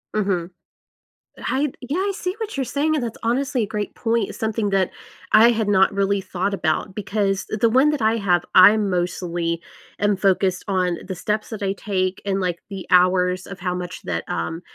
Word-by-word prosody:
Mhm. 190 -4 0 0.9
I 280 +1 -1
yeah, 270 +6 -3
I 395 +1 0
see 365 -1 -3
what 430 -9 -5
you're 265 - +1
saying, 290 +5 0
and 290 - 0
that's 230 -2 -4
honestly 255 +1 0
a - - -1
great 210 0 -4
point, 230 -3 0
it's - - -9
something 220 -1 -1
that 190 -2 +1 0.4
I 225 +2 +8
had 220 -3 0
not 190 -2 +4
really 200 0 +1
thought 190 +2 -2
about 185 +1 -1
because 195 -1 -1
th 215 - -3
the 230 - +4
one 260 +5 +4
that 290 -6 -2
I 220 +1 +3
have, 180 -4 +2
I'm 205 +2 +7
mostly 175 -1 -2 0.4
am 205 0 +2
focused 190 -1 +1
on 180 -3 0
the 190 - -3
steps 210 +4 -2
that 215 -3 -7
I 195 0 0
take 185 -2 -2
and, 195 0 0
like, 180 -2 -1
the 195 -2 -7
hours 180 0 +3
of 195 -2 -9
how 180 -1 -2
much 180 0 -6
that 85 -2 -3
um, 90 - -3
200 Hz, 200 wpm, -22 LUFS, 180-225 Hz, 0.9 s, I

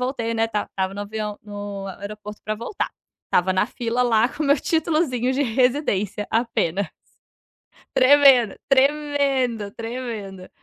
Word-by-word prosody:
voltei, 245 -3 -2
né, 225 0 +1
tal, 210 -2 -1
estava 190 0 -3
no 205 - -5
avião 210 0 -5
no 205 -1 -6
aeroporto 210 +2 -8
pra 215 - -2
voltar. 235 - -4 0.4
Estava 185 +1 +2
na 185 - +2
fila 240 +1 -1
lá 235 -1 +3
com 305 - -5
o - - 0
meu 285 0 +4
títulozinho 305 -7 0
de 270 - -1
residência 230 -5 0
apenas. 205 -5 0 1.0
Tremendo, 260 -5 +6
tremendo, 275 -5 +1
tremendo. 225 -6 -6
230 Hz, 135 wpm, -23 LUFS, 205-260 Hz, 1.0 s, Tremendo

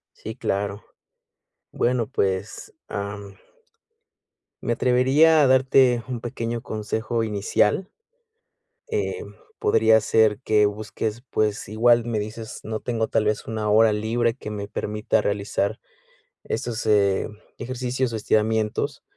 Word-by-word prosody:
Sí, - - -8
claro, 100 +1 -2 0.9
bueno, 120 -2 0
pues, 95 -2 -2
am, 100 -1 -6 1.3
me 120 - 0
atrevería 135 +7 +4
a 140 - +5
darte 130 -1 +4
un 125 -3 -4
pequeño 115 -1 -4
consejo 110 +1 -2
inicial, 105 - 0 1.0
eh, 445 0 -2 0.4
podría 110 0 +4
ser 110 0 +3
que 105 -1 +3
busques, 105 +2 -4
pues, 105 -3 -1
igual 120 +2 +3
me 115 -2 -1
dices, 110 +2 -6
no 110 0 -4
tengo 115 -2 -2
tal 110 - +1
vez, 105 0 -1
una 110 -1 -3
hora 110 +1 +5
libre 115 +2 0
que 120 - -8
me 105 -1 -5
permita 105 0 -1
realizar 100 0 -1 0.7
esos, 115 -2 -3
eh, 100 -3 +3 0.3
ejercicios 130 0 -2
o - - -2
estiramientos, 110 +4 0
110 Hz, 120 wpm, -24 LUFS, 105-120 Hz, 1.3 s, a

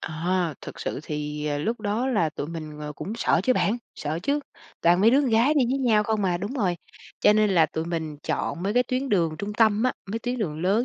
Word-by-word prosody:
À, 170 0 -1
thực - - -9
sự - - -3
thì, 150 0 -4
ờ, 145 -1 -1
lúc 225 +9 -2
đó 215 +5 -1
là 205 -11 +2
tụi 145 - -5
mình, 155 -2 -7
ờ, 150 0 -5
cũng 195 +7 -6
sợ 180 - +2
chứ 255 - +3
bạn, 230 -1 +1 0.2
sợ 155 +2 -3
chứ, 285 +7 +1 0.4
toàn 175 +2 +4
mấy 220 +3 +6
đứa 275 +3 +5
con 265 -5 0
gái 235 +7 +4
đi 275 -4 +4
với 270 - +1
nhau 225 -5 +3
không 215 -2 0
à, 175 -2 +1
đúng 205 +8 -4
rồi. 185 -8 0 0.4
Cho 210 - +6
nên 215 -1 +3
là 165 -4 +5
tụi 160 +1 -4
mình 160 -3 -3
chọn 170 - -2
mấy 205 +3 -1
cái 250 - +5
tuyến 255 +2 -2
đường 165 -7 +1
trung 205 +1 -4
tâm 220 0 +3
á, 255 - +2 0.2
mấy 225 - -2
tuyến 245 +1 -3
đường 160 -7 -3
lớn 205 +6 +2
200 Hz, 255 wpm, -25 LUFS, 160-230 Hz, 0.4 s, mấy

